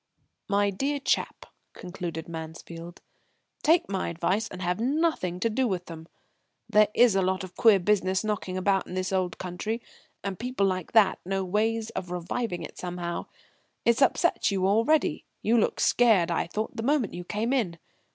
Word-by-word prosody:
"My 200 Hz, 0 st, +2 dB
dear 280 Hz, +9 st, -1 dB
chap," -, -, -1 dB, 0.3 s
concluded 175 Hz, -3 st, -6 dB
Mansfield, 165 Hz, +1 st, -8 dB, 0.6 s
"take 325 Hz, +3 st, +4 dB
my 195 Hz, -1 st, -2 dB
advice 185 Hz, +6 st, 0 dB
and 185 Hz, -, -9 dB
have 180 Hz, +1 st, -1 dB
nothing 260 Hz, -, 0 dB
to -, -, +3 dB
do 245 Hz, +3 st, +1 dB
with 180 Hz, -4 st, -3 dB
'em. 160 Hz, 0 st, -9 dB, 0.6 s
There 215 Hz, -1 st, +5 dB
is 240 Hz, -4 st, +5 dB
a 195 Hz, -, +3 dB
lot 190 Hz, +1 st, 0 dB
of 185 Hz, -1 st, -9 dB
queer 220 Hz, -3 st, +6 dB
business 190 Hz, 0 st, +1 dB
knocking 205 Hz, -3 st, -2 dB
about 195 Hz, +1 st, +1 dB
in 180 Hz, -, -7 dB
this 185 Hz, +1 st, -2 dB
old 185 Hz, -2 st, 0 dB
country, 185 Hz, +5 st, -4 dB, 0.4 s
and 195 Hz, -2 st, -4 dB
people 245 Hz, -4 st, 0 dB
like 185 Hz, -2 st, -2 dB
that 215 Hz, -4 st, +5 dB
know 195 Hz, +1 st, -2 dB
ways 220 Hz, +4 st, 0 dB
of 180 Hz, -, -5 dB
reviving 180 Hz, +1 st, -3 dB
it -, -, -9 dB
somehow. 175 Hz, -1 st, -4 dB, 0.6 s
It's 235 Hz, +3 st, +3 dB
upset 340 Hz, +5 st, +3 dB
you 190 Hz, -2 st, 0 dB
already; 230 Hz, +11 st, +2 dB, 0.2 s
you 225 Hz, -, +3 dB
looked -, -, 0 dB
scared, 210 Hz, -8 st, +4 dB
I 170 Hz, -, 0 dB
thought, 215 Hz, +5 st, -4 dB
the -, -, -3 dB
moment 265 Hz, -2 st, +1 dB
you 175 Hz, -, -6 dB
came 215 Hz, +7 st, -1 dB
in." 195 Hz, -11 st, 0 dB
195 Hz, 170 wpm, -27 LUFS, 180-225 Hz, 0.6 s, queer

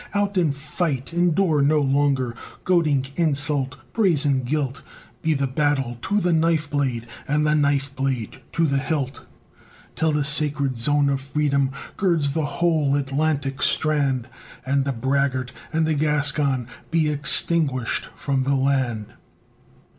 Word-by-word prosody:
Out 205 Hz, 0 st, 0 dB
and 165 Hz, -6 st, +2 dB
fight! 150 Hz, -1 st, -3 dB
Endure 175 Hz, -2 st, +2 dB
no 150 Hz, +2 st, +3 dB
longer 135 Hz, -3 st, +1 dB, 0.3 s
Goading 155 Hz, -7 st, +2 dB
insult, 145 Hz, -4 st, +1 dB, 0.2 s
brazen 150 Hz, -10 st, +2 dB
guilt; 135 Hz, 0 st, -2 dB, 0.4 s
Be 160 Hz, -1 st, +1 dB
the 140 Hz, 0 st, 0 dB
battle 135 Hz, -3 st, -1 dB
to 205 Hz, -, 0 dB
the 180 Hz, -3 st, +1 dB
knife 160 Hz, -1 st, +2 dB
blade, 130 Hz, -5 st, -1 dB, 0.2 s
And 150 Hz, +1 st, +1 dB
the 150 Hz, -, +3 dB
knife 140 Hz, -2 st, +1 dB
blade 130 Hz, -2 st, -3 dB
to 165 Hz, -, +2 dB
the 140 Hz, -2 st, +1 dB
hilt, 135 Hz, -2 st, -3 dB, 0.7 s
Till 160 Hz, -1 st, +1 dB
the 150 Hz, -1 st, +1 dB
sacred 145 Hz, -3 st, 0 dB
zone 145 Hz, +3 st, +3 dB
of 135 Hz, -1 st, 0 dB
Freedom 140 Hz, -1 st, 0 dB, 0.3 s
Girds 170 Hz, -7 st, +2 dB
the 155 Hz, +1 st, -1 dB
whole 155 Hz, -2 st, +1 dB
Atlantic 140 Hz, -1 st, -1 dB
strand, 140 Hz, -5 st, +1 dB, 0.4 s
And 135 Hz, +1 st, +1 dB
the 140 Hz, -, 0 dB
braggart 130 Hz, 0 st, -1 dB, 0.2 s
and 160 Hz, 0 st, +1 dB
the 160 Hz, -, +1 dB
Gascon 145 Hz, -4 st, +1 dB, 0.2 s
Be 165 Hz, -2 st, +2 dB
extinguished 145 Hz, -3 st, +1 dB
from 135 Hz, -2 st, -1 dB
the 140 Hz, +2 st, +1 dB
land. 130 Hz, -5 st, 0 dB
145 Hz, 140 wpm, -23 LUFS, 135-155 Hz, 0.7 s, no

